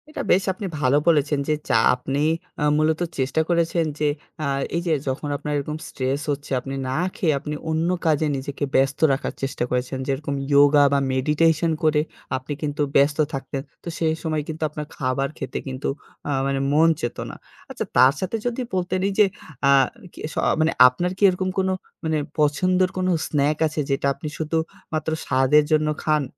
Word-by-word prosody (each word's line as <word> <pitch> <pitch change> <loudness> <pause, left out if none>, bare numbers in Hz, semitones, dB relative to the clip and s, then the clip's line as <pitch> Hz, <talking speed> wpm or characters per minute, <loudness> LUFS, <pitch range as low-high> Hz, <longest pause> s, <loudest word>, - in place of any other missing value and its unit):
এটা 305 - -5
বেশ 190 - +4
আপনি 200 +2 -6
ভালো 140 0 +3
বলেছেন 150 -3 +3
যে, 155 - +2 0.2
যা - - +3 0.2
আপনি 135 +3 -3 0.4
আ - - +2
মূলত 155 +2 +1 0.2
চেষ্টা 135 +4 +1
করেছেন 170 -1 +2
যে 150 - +2 0.4
আ - - 0 0.3
এই 170 - 0
যে 165 - +3
যখন 135 +3 -2
আপনার 150 +1 -4
এরকম 150 +2 -3
স্ট্রেস 135 +2 -2
হচ্ছে 145 0 -5
আপনি 135 +2 -6
না 130 - -1 0.2
খেয়ে 160 -4 +1
আপনি 150 +1 -5
অন্য 160 +2 +1 0.2
কাজে 155 -1 +3
নিজেকে 135 +2 -5
ব্যস্ত 135 +1 +2
রাখার 135 - -3
চেষ্টা 135 -2 -2
করেছেন, 125 +1 -1
যেরকম 140 +1 -2 0.2
ইওগা 145 +1 +6
বা 140 - +4
মেডিটেশন 155 +5 +2
করে 155 -1 +3 0.4
আপনি 130 +3 -6
কিন্তু 150 -1 -2
ব্যস্ত 140 +1 +4 0.2
থাকতেন। 135 0 -4 0.2
তো - - -11
সেই 160 -1 +2
সময় 155 -2 -1
কিন্তু 160 0 -5
আপনার 150 0 -6
খাবার 135 +1 -1
খেতে - - -4
কিন্তু 130 0 -3 0.4
আ - - 0 0.2
মানে 135 0 0
মন 160 +3 +5
চাইতোনা 120 - -4 0.3
আচ্ছা - - -4
তার 130 +2 +7
সাথে 190 +4 -2
যদি 245 +1 -1
বলতেন 185 0 0
এই 200 - -1
যে 210 - +8 0.4
আ - - +7 0.4
কি - - -13
স - - -12 0.2
মানে 160 +1 +3 0.2
আপনার 175 +8 -1
কি - - -3
এরকম 185 +1 -1
কোনো 190 0 +1 0.3
মানে 160 -1 0 0.2
পছন্দের 180 +5 +2
কোনো 185 0 +1 0.2
স্ন্যাক 150 0 +1
আছে 155 0 -5
যেটা 135 0 +1
আপনি 140 - -8
শুধু 160 +1 -1 0.4
মাত্র 155 0 -1 0.2
স্বাদের 135 +3 +4
জন্য 155 0 +3 0.2
খান? 155 -1 +2
150 Hz, 180 wpm, -23 LUFS, 140-160 Hz, 0.4 s, যে